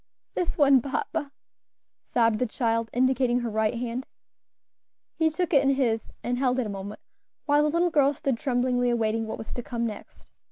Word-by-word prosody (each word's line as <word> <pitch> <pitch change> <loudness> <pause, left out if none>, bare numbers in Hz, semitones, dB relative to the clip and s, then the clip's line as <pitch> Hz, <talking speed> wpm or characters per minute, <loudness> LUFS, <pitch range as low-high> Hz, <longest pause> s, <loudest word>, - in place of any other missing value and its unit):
"This 355 - -2
one, 275 -4 +6
papa," 280 +1 -3 0.7
sobbed 230 -2 +1
the 250 - +1
child, 230 -1 -1
indicating 250 -1 +2
her 235 -2 -3
right 220 +1 +1
hand. 245 +2 -4 1.1
He 320 -1 +2
took 355 +3 -2
it 280 - +6
in 275 0 +2
his 230 -5 0
and 245 +1 -1
held 255 -1 +1
it 255 - 0
a - - -4
moment, 200 +1 -7 0.4
while 290 0 +4
the 300 - +2
little 340 +3 +1
girl 285 -3 +4
stood 275 -5 -1
tremblingly 245 -1 +1
awaiting 225 -1 0
what - - -4
was 220 - -8
to 245 - -4
come 235 -1 -3
next. 215 -3 -8
245 Hz, 185 wpm, -26 LUFS, 230-275 Hz, 1.1 s, one